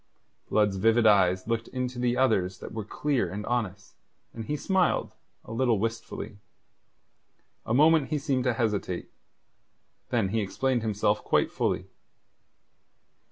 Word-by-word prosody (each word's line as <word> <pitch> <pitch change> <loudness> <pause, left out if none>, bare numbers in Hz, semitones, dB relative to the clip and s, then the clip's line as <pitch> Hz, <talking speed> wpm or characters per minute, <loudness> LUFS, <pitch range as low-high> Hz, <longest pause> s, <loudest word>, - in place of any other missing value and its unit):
Blood's 105 -2 +2
vivid 115 +3 +3
eyes 95 -3 +4
looked 115 -1 -1
into 125 -1 -4
the 120 0 +1
other's 100 -8 +2
that - - -9
were 110 -1 -4
clear 125 - -1
and 105 +2 -5
honest, 105 -5 -3 0.4
and 115 -1 -6
he 150 - -2
smiled, 190 +2 +1 0.3
a - - -10
little 120 -1 +2
wistfully. 115 -1 -4 1.3
A 110 - 0
moment 155 0 +5
he 155 - 0
seemed 135 -3 -1
to 125 - +2
hesitate. 105 -6 -2 1.0
Then 115 -6 +1
he 110 +2 0
explained 125 +5 0
himself 105 -1 0
quite - - +1
fully. - - -1
115 Hz, 135 wpm, -27 LUFS, 105-130 Hz, 1.3 s, moment